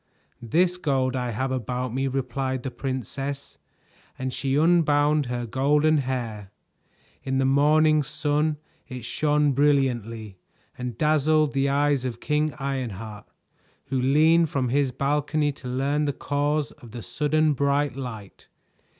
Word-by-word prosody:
"This 175 Hz, +9 st, +1 dB
gold 135 Hz, -6 st, 0 dB
I 125 Hz, -1 st, -2 dB
have 130 Hz, +4 st, -2 dB
about 125 Hz, 0 st, -3 dB
me," 135 Hz, +1 st, 0 dB
replied 130 Hz, 0 st, -2 dB
the 130 Hz, -, -4 dB
princess, 135 Hz, +2 st, -5 dB, 0.6 s
and 130 Hz, -1 st, -3 dB
she 135 Hz, +1 st, -1 dB
unbound 150 Hz, -3 st, +3 dB
her 120 Hz, 0 st, -3 dB
golden 145 Hz, +6 st, +2 dB
hair. 120 Hz, -7 st, -4 dB, 0.7 s
In 135 Hz, 0 st, -2 dB
the 135 Hz, -, +2 dB
morning 150 Hz, +3 st, +4 dB
sun 150 Hz, +1 st, 0 dB, 0.3 s
it 125 Hz, -4 st, -7 dB
shone 150 Hz, -1 st, +1 dB
brilliantly 120 Hz, -8 st, 0 dB, 0.4 s
and 125 Hz, -2 st, -5 dB
dazzled 155 Hz, -1 st, +2 dB
the 140 Hz, 0 st, +1 dB
eyes 140 Hz, -1 st, +2 dB
of 120 Hz, -2 st, -4 dB
King 150 Hz, +2 st, 0 dB
Ironheart, 115 Hz, -7 st, -5 dB, 0.6 s
who 130 Hz, -1 st, 0 dB
leaned 155 Hz, +5 st, +4 dB
from 130 Hz, -3 st, -1 dB
his 140 Hz, +1 st, +2 dB
balcony 145 Hz, +2 st, 0 dB
to 130 Hz, -, -11 dB
learn 140 Hz, +4 st, 0 dB
the 145 Hz, -, -1 dB
cause 145 Hz, +1 st, -1 dB
of 115 Hz, -2 st, -15 dB
the 120 Hz, -2 st, -7 dB
sudden 155 Hz, +1 st, +1 dB
bright 140 Hz, 0 st, 0 dB
light. 115 Hz, -7 st, -8 dB
135 Hz, 135 wpm, -25 LUFS, 125-150 Hz, 0.7 s, morning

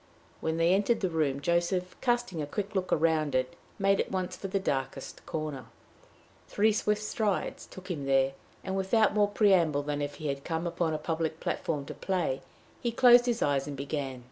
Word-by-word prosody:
When 160 Hz, 0 st, -1 dB
they 165 Hz, +2 st, +4 dB
entered 205 Hz, +4 st, +2 dB
the 185 Hz, -3 st, 0 dB
room, 145 Hz, -4 st, 0 dB
Joseph, 175 Hz, +3 st, 0 dB
casting 240 Hz, -9 st, 0 dB
a 145 Hz, -, -3 dB
quick 205 Hz, +6 st, -4 dB
look 185 Hz, -2 st, -1 dB
round 155 Hz, -3 st, +2 dB
it, 130 Hz, 0 st, 0 dB, 0.2 s
made 195 Hz, -1 st, +3 dB
at -, -, -4 dB
once 185 Hz, -2 st, -2 dB
for 195 Hz, -, -6 dB
the 195 Hz, +1 st, -1 dB
darkest 135 Hz, -5 st, -3 dB
corner. 155 Hz, -4 st, -4 dB, 0.8 s
Three 215 Hz, +2 st, +3 dB
swift 210 Hz, 0 st, 0 dB
strides 215 Hz, -2 st, -2 dB
took 185 Hz, 0 st, -9 dB
him 145 Hz, -5 st, -4 dB
there; 135 Hz, 0 st, +3 dB, 0.3 s
and, 190 Hz, -, -3 dB
without 195 Hz, +3 st, +3 dB
more 205 Hz, -1 st, +4 dB
preamble 180 Hz, -8 st, +3 dB
than 145 Hz, 0 st, -2 dB
if 145 Hz, 0 st, -3 dB
he 155 Hz, -1 st, -4 dB
had 140 Hz, 0 st, -3 dB
come 165 Hz, 0 st, -2 dB
upon 170 Hz, -2 st, -1 dB
a -, -, 0 dB
public 160 Hz, 0 st, -2 dB
platform 145 Hz, -4 st, -2 dB
to -, -, -7 dB
play, 175 Hz, -8 st, -1 dB, 0.4 s
he 240 Hz, -, 0 dB
closed 245 Hz, +1 st, +6 dB
his 235 Hz, -1 st, +1 dB
eyes 140 Hz, -1 st, +1 dB
and 145 Hz, -1 st, -5 dB
began. 140 Hz, -2 st, -3 dB
170 Hz, 195 wpm, -29 LUFS, 145-195 Hz, 0.8 s, closed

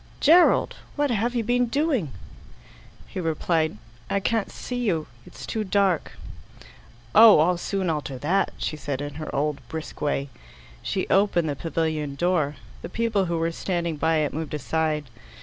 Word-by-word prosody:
"Gerald, 340 Hz, +4 st, +5 dB, 0.2 s
what 290 Hz, -2 st, +1 dB
have 235 Hz, +2 st, 0 dB
you 235 Hz, -, +1 dB
been 245 Hz, +2 st, +2 dB
doing?" 270 Hz, -, 0 dB, 1.0 s
He -, -, -6 dB
replied, 160 Hz, -3 st, 0 dB, 0.3 s
"I 200 Hz, -, +1 dB
can't 220 Hz, +1 st, -1 dB
see 250 Hz, -, -5 dB
you. 185 Hz, -11 st, 0 dB, 0.2 s
It's -, -, -10 dB
too 220 Hz, -, -2 dB
dark." 195 Hz, -4 st, +1 dB, 1.0 s
"Oh, 220 Hz, -1 st, +9 dB
I'll 175 Hz, +3 st, +3 dB
soon 195 Hz, 0 st, -2 dB
alter 150 Hz, -4 st, -2 dB
that," 175 Hz, +9 st, +1 dB
she -, -, -3 dB
said 140 Hz, -2 st, -4 dB
in 145 Hz, 0 st, -5 dB
her 155 Hz, -, -5 dB
old 145 Hz, +1 st, 0 dB
brisk 160 Hz, +3 st, -7 dB
way. 145 Hz, -1 st, -1 dB, 0.5 s
She 190 Hz, -, -2 dB
opened 190 Hz, -5 st, +3 dB
the 145 Hz, -, -2 dB
pavilion 155 Hz, -2 st, -2 dB
door. 155 Hz, -3 st, +1 dB, 0.3 s
The -, -, -6 dB
people 225 Hz, -4 st, 0 dB
who 170 Hz, -1 st, -1 dB
were 165 Hz, +1 st, 0 dB
standing 170 Hz, -1 st, -2 dB
by 160 Hz, +2 st, +2 dB
it 155 Hz, -2 st, 0 dB
moved 155 Hz, -1 st, -4 dB
aside. 155 Hz, +1 st, -1 dB
170 Hz, 160 wpm, -25 LUFS, 150-205 Hz, 1.0 s, Oh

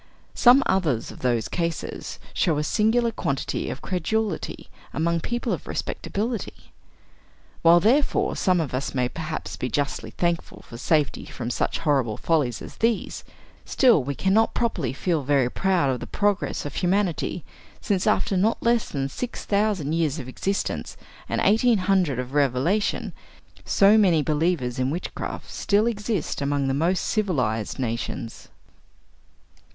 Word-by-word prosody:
Some 255 Hz, +3 st, +6 dB
others 160 Hz, -12 st, 0 dB
of -, -, -12 dB
those 120 Hz, -3 st, 0 dB
cases 170 Hz, -2 st, -4 dB, 0.2 s
show 165 Hz, -5 st, +1 dB
a 150 Hz, -, 0 dB
singular 230 Hz, +7 st, +2 dB
quantity 140 Hz, -10 st, -2 dB
of 130 Hz, -, -6 dB
credulity 200 Hz, +4 st, -2 dB, 0.3 s
among 170 Hz, +2 st, +1 dB
people 240 Hz, +7 st, -2 dB
of -, -, -5 dB
respectability. 225 Hz, +2 st, -4 dB, 0.9 s
While 170 Hz, +1 st, +7 dB
therefore 245 Hz, -, +2 dB
some 185 Hz, -2 st, +2 dB
of 155 Hz, -6 st, -2 dB
us 130 Hz, +2 st, -3 dB
may 125 Hz, -1 st, +1 dB
perhaps 155 Hz, +3 st, -5 dB
be 125 Hz, -, -3 dB
justly 145 Hz, +4 st, -2 dB
thankful 170 Hz, -1 st, -2 dB
for 115 Hz, -, -10 dB
safety 150 Hz, -1 st, +1 dB
from 120 Hz, 0 st, -5 dB
such -, -, -1 dB
horrible 135 Hz, -8 st, +1 dB
follies 145 Hz, -8 st, 0 dB
as -, -, -10 dB
these, 230 Hz, -1 st, -1 dB, 0.4 s
still 240 Hz, -, +4 dB
we 140 Hz, +2 st, -3 dB
can 190 Hz, +6 st, +1 dB
not 225 Hz, +2 st, +3 dB
properly 175 Hz, -, 0 dB
feel 160 Hz, +4 st, -1 dB
very 135 Hz, -2 st, +2 dB
proud 180 Hz, -8 st, +1 dB
of 125 Hz, -, -2 dB
the -, -, -7 dB
progress 205 Hz, -5 st, 0 dB
of 145 Hz, -, -5 dB
humanity, 180 Hz, -3 st, 0 dB, 0.3 s
since 195 Hz, -3 st, 0 dB
after 195 Hz, -, +2 dB
not 210 Hz, +5 st, +1 dB
less 235 Hz, -1 st, +2 dB
than 135 Hz, -2 st, -2 dB
six 245 Hz, -, -6 dB
thousand 200 Hz, -7 st, +1 dB
years 160 Hz, -3 st, 0 dB
of 130 Hz, -5 st, -6 dB
existence 195 Hz, +9 st, -3 dB, 0.3 s
and -, -, 0 dB
eighteen 225 Hz, +2 st, +4 dB
hundred 185 Hz, -7 st, +1 dB
of 125 Hz, +1 st, -4 dB
revelation, 145 Hz, -, +1 dB, 0.5 s
so 205 Hz, +2 st, +5 dB
many 175 Hz, -7 st, +4 dB
believers 150 Hz, -5 st, 0 dB
in 130 Hz, +1 st, +1 dB
witchcraft 170 Hz, +5 st, -5 dB
still 205 Hz, +2 st, +2 dB
exist 210 Hz, -8 st, -2 dB
among 140 Hz, -1 st, 0 dB
the 135 Hz, -, +1 dB
most 170 Hz, +6 st, +1 dB
civilized 125 Hz, -, -1 dB
nations. 115 Hz, -2 st, -4 dB
170 Hz, 145 wpm, -24 LUFS, 135-205 Hz, 0.9 s, While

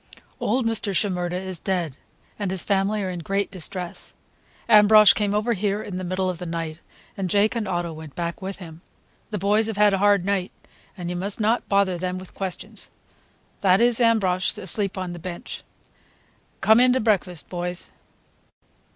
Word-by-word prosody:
Old 245 Hz, +3 st, 0 dB
Mr. 220 Hz, -3 st, 0 dB
Shimerda 180 Hz, -3 st, 0 dB
is 185 Hz, -2 st, -6 dB
dead, 175 Hz, -8 st, -2 dB, 0.4 s
and 200 Hz, -2 st, -1 dB
his 185 Hz, -1 st, +1 dB
family 200 Hz, +1 st, +1 dB
are 185 Hz, -, -2 dB
in 175 Hz, -, -5 dB
great 195 Hz, +4 st, -1 dB
distress. 180 Hz, 0 st, -6 dB, 0.5 s
Ambrosch 210 Hz, -1 st, +8 dB
came 205 Hz, -1 st, 0 dB
over 220 Hz, +3 st, +1 dB
here 205 Hz, 0 st, -1 dB
in 185 Hz, -, -6 dB
the 185 Hz, -, -4 dB
middle 185 Hz, +1 st, -1 dB
of 180 Hz, -2 st, -3 dB
the 180 Hz, -, -5 dB
night, 165 Hz, -1 st, -4 dB, 0.4 s
and 190 Hz, -2 st, -3 dB
Jake 205 Hz, +5 st, +3 dB
and 225 Hz, -3 st, -2 dB
Otto 175 Hz, -2 st, -2 dB
went 155 Hz, -2 st, -10 dB
back 170 Hz, +1 st, -4 dB
with 190 Hz, +1 st, -5 dB
him. 165 Hz, -3 st, -11 dB, 0.5 s
The 210 Hz, -, -3 dB
boys 205 Hz, +3 st, +2 dB
have 220 Hz, -2 st, -4 dB
had 210 Hz, -1 st, +5 dB
a 195 Hz, -, +1 dB
hard 200 Hz, -2 st, +4 dB
night, 195 Hz, -2 st, 0 dB, 0.5 s
and 175 Hz, -1 st, -4 dB
you -, -, -3 dB
must 195 Hz, +4 st, -4 dB
not 220 Hz, +2 st, +1 dB
bother 200 Hz, -3 st, +2 dB
them 185 Hz, +1 st, -2 dB
with 185 Hz, 0 st, -9 dB
questions. 190 Hz, -3 st, -5 dB, 0.7 s
That 190 Hz, -1 st, +4 dB
is 240 Hz, 0 st, +3 dB
Ambrosch, 195 Hz, -6 st, +2 dB
asleep 195 Hz, +2 st, 0 dB
on 185 Hz, -2 st, -4 dB
the 175 Hz, -, -8 dB
bench. 175 Hz, +1 st, -7 dB, 1.0 s
Come 220 Hz, +2 st, +6 dB
in 250 Hz, 0 st, +5 dB
to 260 Hz, -, +2 dB
breakfast, 190 Hz, -, 0 dB
boys." 175 Hz, 0 st, -3 dB
190 Hz, 180 wpm, -24 LUFS, 180-210 Hz, 1.0 s, Ambrosch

